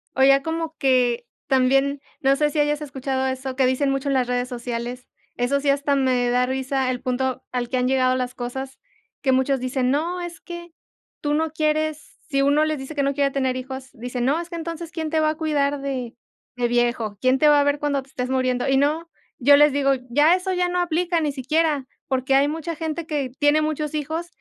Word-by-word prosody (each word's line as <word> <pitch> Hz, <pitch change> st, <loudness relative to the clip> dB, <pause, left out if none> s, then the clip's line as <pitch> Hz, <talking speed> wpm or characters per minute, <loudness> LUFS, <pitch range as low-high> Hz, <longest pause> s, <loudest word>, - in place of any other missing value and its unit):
O 265 Hz, -, +3 dB
ya 275 Hz, 0 st, +6 dB
como 325 Hz, 0 st, -3 dB
que 245 Hz, -3 st, +2 dB, 0.2 s
también, 270 Hz, +1 st, +2 dB, 0.2 s
no 270 Hz, 0 st, +4 dB
sé 300 Hz, +1 st, +2 dB
si 300 Hz, -, -2 dB
hayas 295 Hz, 0 st, +1 dB
escuchado 265 Hz, -2 st, -2 dB
eso 260 Hz, 0 st, -4 dB
que 265 Hz, 0 st, +3 dB
dicen 260 Hz, +2 st, +1 dB
mucho 275 Hz, +1 st, -1 dB
en -, -, +1 dB
las 255 Hz, -2 st, +1 dB
redes 250 Hz, 0 st, -1 dB
sociales, 245 Hz, 0 st, -5 dB, 0.3 s
eso 245 Hz, +3 st, +1 dB
sí, 285 Hz, -, +1 dB
hasta 280 Hz, 0 st, +2 dB
me 255 Hz, -2 st, +2 dB
da 250 Hz, +1 st, +2 dB
risa 265 Hz, 0 st, -1 dB
el 250 Hz, -, -4 dB
punto 255 Hz, 0 st, -1 dB
al 245 Hz, -1 st, -2 dB
que 255 Hz, -, 0 dB
han 250 Hz, 0 st, +1 dB
llegado 255 Hz, -1 st, +2 dB
las 250 Hz, 0 st, -3 dB
cosas, 265 Hz, +2 st, -5 dB, 0.4 s
que 265 Hz, -, +2 dB
muchos 265 Hz, +1 st, +2 dB
dicen, 255 Hz, 0 st, 0 dB
no, 335 Hz, +6 st, -1 dB
es 345 Hz, -1 st, -7 dB
que 345 Hz, -1 st, -9 dB, 0.5 s
tú 295 Hz, 0 st, 0 dB
no 315 Hz, +1 st, 0 dB
quieres. 310 Hz, -1 st, -1 dB
Si 275 Hz, -2 st, +1 dB
uno 285 Hz, +2 st, +3 dB
les 310 Hz, -1 st, -1 dB
dice 270 Hz, +3 st, -7 dB
que 285 Hz, -, +1 dB
no 280 Hz, 0 st, +1 dB
quiere 280 Hz, 0 st, +1 dB
tener 260 Hz, -2 st, 0 dB
hijos, 260 Hz, 0 st, -7 dB
dicen: 245 Hz, +1 st, -4 dB
"No, 285 Hz, +5 st, +2 dB
es 345 Hz, -, -9 dB
que 345 Hz, -, -6 dB
entonces, 330 Hz, 0 st, -6 dB
¿quién 320 Hz, -2 st, -3 dB
te 320 Hz, 0 st, +1 dB
va 310 Hz, -, +3 dB
a 310 Hz, -, -1 dB
cuidar 290 Hz, -3 st, 0 dB
de 260 Hz, -4 st, -4 dB, 0.4 s
de 245 Hz, -1 st, +1 dB
viejo? 240 Hz, -3 st, 0 dB
¿Quién 255 Hz, +1 st, +3 dB
te 300 Hz, -, +5 dB
va 295 Hz, -1 st, +6 dB
a -, -, +4 dB
ver 285 Hz, 0 st, +1 dB
cuando 285 Hz, -2 st, 0 dB
te 270 Hz, -, -24 dB
estés 250 Hz, -1 st, -4 dB
muriendo?" 255 Hz, -1 st, 0 dB
Y 270 Hz, -, +3 dB
no, 305 Hz, +4 st, +1 dB, 0.3 s
yo 285 Hz, +3 st, +7 dB
les 295 Hz, 0 st, +6 dB
digo: 275 Hz, -1 st, +2 dB, 0.2 s
"Ya 295 Hz, +7 st, +5 dB
eso 370 Hz, +1 st, -2 dB
ya 360 Hz, 0 st, +1 dB
no 360 Hz, 0 st, 0 dB
aplica, 345 Hz, 0 st, 0 dB
ni 300 Hz, -2 st, 0 dB
siquiera. 285 Hz, +1 st, 0 dB, 0.2 s
Porque 265 Hz, 0 st, +1 dB
hay 275 Hz, +1 st, +4 dB
mucha 325 Hz, +2 st, -4 dB
gente 320 Hz, +1 st, -4 dB
que 285 Hz, -5 st, -2 dB
tiene 290 Hz, +1 st, +4 dB
muchos 305 Hz, -1 st, -2 dB
hijos 315 Hz, +3 st, -3 dB
275 Hz, 225 wpm, -23 LUFS, 255-305 Hz, 0.5 s, yo